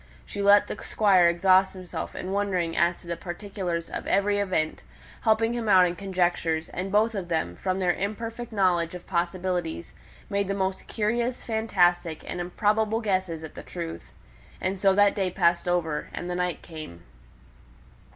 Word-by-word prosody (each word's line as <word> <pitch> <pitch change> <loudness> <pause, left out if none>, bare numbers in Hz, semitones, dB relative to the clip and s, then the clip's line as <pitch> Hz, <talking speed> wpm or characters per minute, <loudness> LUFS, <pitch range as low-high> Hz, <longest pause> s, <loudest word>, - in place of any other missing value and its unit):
She 205 - -5
let 200 +1 +6
the - - -7
Squire 190 -5 +4
exhaust 185 +2 +4
himself 180 -3 -6
in 185 - -5
wondering 185 -4 0
as 170 +1 +2
to - - -15
the 170 - -2
particulars 175 -1 -4
of - - -6
every 205 +1 +2
event, 180 -6 -1 0.4
helping 225 +1 +2
him 235 -3 -2
out 185 -2 +7
in 175 0 -1
conjectures; 175 -4 0
and 190 +2 -4
both 220 +3 +3
of 195 -4 -4
them, 160 - -1
from 185 - -2
their 180 -2 +2
imperfect 230 +4 -4
knowledge 180 -5 +1
of 180 - -9
possibilities, 175 -1 -2 0.3
made 200 -1 0
the 200 - -1
most 190 -1 -2
curious, 235 +3 -1
fantastic, 180 -7 +1
and 180 - -3
improbable 215 +4 +1
guesses 185 -7 -1
at 160 - -8
the - - -8
truth. 170 -2 -6 0.5
And 190 +1 -2
so 195 0 +4
that 205 0 +5
day 195 -3 0
passed 170 -1 +2
over, 160 -4 0
and 175 - -5
the 180 - -2
night 180 -1 -2
came. 155 - -9
185 Hz, 170 wpm, -26 LUFS, 175-205 Hz, 0.5 s, out